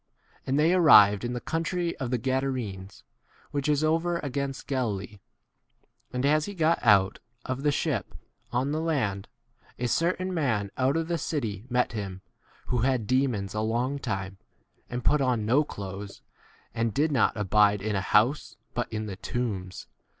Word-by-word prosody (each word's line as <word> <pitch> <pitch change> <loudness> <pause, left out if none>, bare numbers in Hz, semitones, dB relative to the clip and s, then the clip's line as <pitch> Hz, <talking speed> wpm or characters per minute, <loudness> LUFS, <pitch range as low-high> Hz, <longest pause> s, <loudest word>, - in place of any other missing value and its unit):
28 - - -7
And 135 +2 +2
they 160 +4 +4
arrived 105 - +7
in 120 0 -2
the 120 - -3
country 170 +4 -2
of 130 -3 -3
the 125 - +1
Gadarenes, 120 -7 -3 0.5
which 145 0 -1
is 150 0 +2
over 165 +2 +1
2 - - +1
7 - - -7
against 140 0 -3
Galilee. 105 -7 -3 0.9
And 125 +1 -1
as 150 +1 +3
he 205 - -7
got 165 -1 +2
out 100 -4 +4 0.3
[of 130 +1 -3
the 145 0 +2
ship] - - -2 0.4
on 130 +3 0
the 155 +1 -1
land, 115 -12 -1 0.5
a 125 - -1
certain 180 +7 0
man 115 - 0
out 130 +4 +1
of 165 0 -1
the 170 -1 -1
city 115 - -3
met 125 0 +1
him, 100 -4 -5 0.4
who 125 - -1
had 125 -2 +1
demons 125 -5 0
a 105 - -1
long 120 +6 -1
time, 95 -7 -4 0.5
and 125 0 -5
put 150 -1 +4
on 125 -5 +1
no 130 +7 +4
clothes, 100 -5 -8 0.5
and 115 -2 -1
did 150 +3 +2
not 120 -4 +2
abide 105 0 +3
in 105 -1 -1
a 95 - 0
house, 110 +9 +2 0.2
but - - -3
in 110 0 -3
the 100 -3 -5
28 - - -40
tombs. 100 -7 -4
125 Hz, 180 wpm, -27 LUFS, 105-145 Hz, 0.9 s, arrived